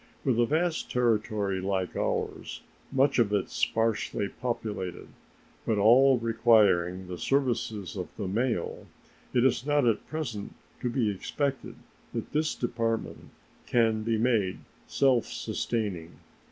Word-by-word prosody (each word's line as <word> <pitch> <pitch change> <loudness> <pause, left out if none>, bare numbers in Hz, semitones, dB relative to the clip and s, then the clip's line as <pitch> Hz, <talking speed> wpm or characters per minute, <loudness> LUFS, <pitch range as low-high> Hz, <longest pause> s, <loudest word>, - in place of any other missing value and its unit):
With 125 -4 +2
a 120 - +4
vast 165 +3 0
territory 110 -5 +1
like 95 -2 -2
ours, - - -3 0.3
much 135 0 +3
of 110 -3 +3
it 100 -2 0
sparsely 110 -2 0
populated, 105 -7 -4 0.5
but 110 - 0
all 125 +6 +6
requiring 105 -6 +3
the 90 -1 -6
services 110 - -1
of 90 -3 -4
the 100 - -3
mail, 110 -1 -2 0.4
it 125 0 +3
is 130 - +2
not 145 -1 +2
at 115 -2 +1
present 125 -10 -5 0.3
to 125 - 0
be 115 -3 +1
expected 135 +7 -3 0.4
that - - -4
this 155 +1 0
Department 115 -2 -2 0.4
can 115 -2 +2
be 115 0 0
made 110 -5 +1 0.3
self 130 -4 +2
sustaining. 95 -8 -3
115 Hz, 125 wpm, -28 LUFS, 100-125 Hz, 0.5 s, all